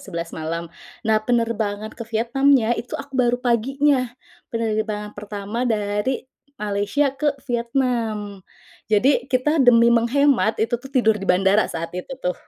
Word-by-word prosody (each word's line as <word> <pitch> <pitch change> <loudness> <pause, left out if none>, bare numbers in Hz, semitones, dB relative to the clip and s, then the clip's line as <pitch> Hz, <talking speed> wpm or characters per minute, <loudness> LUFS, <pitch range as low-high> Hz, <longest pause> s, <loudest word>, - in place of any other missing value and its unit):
11.00 170 -3 -6
malam. 165 +1 -5 0.3
Nah, 215 0 +3
penerbangan 220 -2 -1
ke 230 -1 -9
Vietnamnya 240 +2 +2
itu 240 +1 -4
aku 280 0 -9
baru 245 -2 +2
paginya. 255 +2 +1 0.4
Penerbangan 215 -2 -2
pertama 210 +4 -4
dari 210 +4 -1 0.3
Malaysia 210 +7 0
ke 290 0 0
Vietnam. 235 -5 -1 0.5
Jadi 245 +4 +2
kita 270 +5 +1
demi 235 -2 +6
menghemat, 240 0 +3
itu 230 +2 0
tuh 270 - -10
tidur 220 -6 +2
di 195 - -6
bandara 195 +3 +3
saat 165 +1 -5
itu 180 +9 -6
tuh. 180 -8 -2
230 Hz, 135 wpm, -22 LUFS, 210-255 Hz, 0.5 s, demi